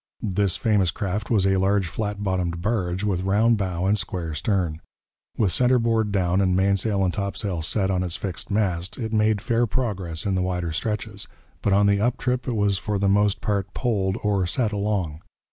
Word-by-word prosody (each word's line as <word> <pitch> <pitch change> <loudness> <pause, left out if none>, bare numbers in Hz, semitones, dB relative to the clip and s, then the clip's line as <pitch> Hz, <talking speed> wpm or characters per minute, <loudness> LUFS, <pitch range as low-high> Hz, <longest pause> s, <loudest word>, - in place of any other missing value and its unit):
This 100 -1 +1
famous 105 -6 +2
craft 100 +3 -3
was 105 -5 +3
a 95 0 +3
large, 95 +1 +2
flat 105 +3 -3
bottomed 90 -3 -1
barge, 95 -2 -1
with 95 -4 0
round 105 +5 +3
bow 95 -3 -2
and 100 +2 +2
square 90 -5 -3
stern. 85 -1 -1 0.6
With 100 -5 +2
centre 125 +6 +3
board 115 -2 +1
down 95 -1 +1
and 95 -2 +2
mainsail 100 +1 +2
and 90 - 0
topsail 100 -3 -2
set 95 +4 0
on 90 -1 +1
its 90 -2 -2
fixed 85 -5 -5
mast, 95 -4 -1
it 115 -3 -4
made 110 -1 +2
fair 115 +2 +1
progress 95 -10 -2
in 100 - 0
the 95 - +1
wider 90 -2 -1
stretches. 105 +3 -3 0.3
But 100 - +1
on 100 +1 +4
the 100 0 +3
up 120 +2 +1
trip 125 -1 -1
it 125 - -1
was 100 -2 +1
for 105 0 -2
the 100 0 +1
most 100 0 +2
part 100 -2 -2
poled 100 -5 0
or 100 -3 +1
'set' 110 +4 0
along. 100 -7 -1
100 Hz, 195 wpm, -24 LUFS, 90-105 Hz, 0.6 s, on